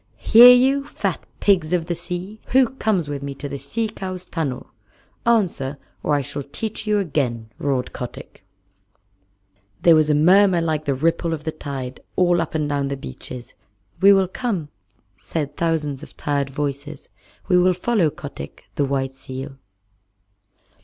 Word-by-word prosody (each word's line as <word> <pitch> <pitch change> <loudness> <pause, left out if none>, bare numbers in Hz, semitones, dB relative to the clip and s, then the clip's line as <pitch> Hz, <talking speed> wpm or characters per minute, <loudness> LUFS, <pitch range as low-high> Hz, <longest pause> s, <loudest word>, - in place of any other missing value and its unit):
"Hear 240 +2 +9
you, 265 +3 +4
fat - - -3 0.2
pigs 180 -5 +2
of 170 -2 +1
the 175 - -2
sea. 180 +5 -6
Who 260 -2 +5
comes 215 - -1
with 145 -1 -4
me 140 0 -5
to 145 - -6
the 140 0 -6
Sea 220 +12 -2
Cow's 185 -3 -6
tunnel? 145 -9 -4 0.6
Answer, 175 - +1 0.2
or 150 - +1
I 145 - 0
shall 145 - -4
teach 210 +10 -5
you 210 0 +3
again," 130 - -1
roared 135 -3 -1
Kotick. 120 -6 -8 1.4
There 170 - +7
was 155 -1 +4
a 150 - +4
murmur 185 +4 +5
like 155 -2 -1
the 140 - 0
ripple 165 +3 0
of 150 - -11
the 160 - -2
tide 135 -4 -6 0.2
all 175 -2 +3
up 165 -1 -4
and 155 -2 0
down 140 -1 -1
the 140 0 -3
beaches. 125 - -9 0.5
"We 200 +1 +7
will 195 -1 +4
come," 190 -7 -3 0.5
said 145 +6 -4
thousands 155 -5 -1
of - - -13
tired 140 -2 -1
voices. 145 +1 -5 0.4
"We 180 -2 +4
will 180 0 +3
follow 185 -3 +2
Kotick, 145 -1 -9
the 145 - 0
White 135 -1 -1
Seal." 135 +1 -7
155 Hz, 160 wpm, -22 LUFS, 140-185 Hz, 1.4 s, Hear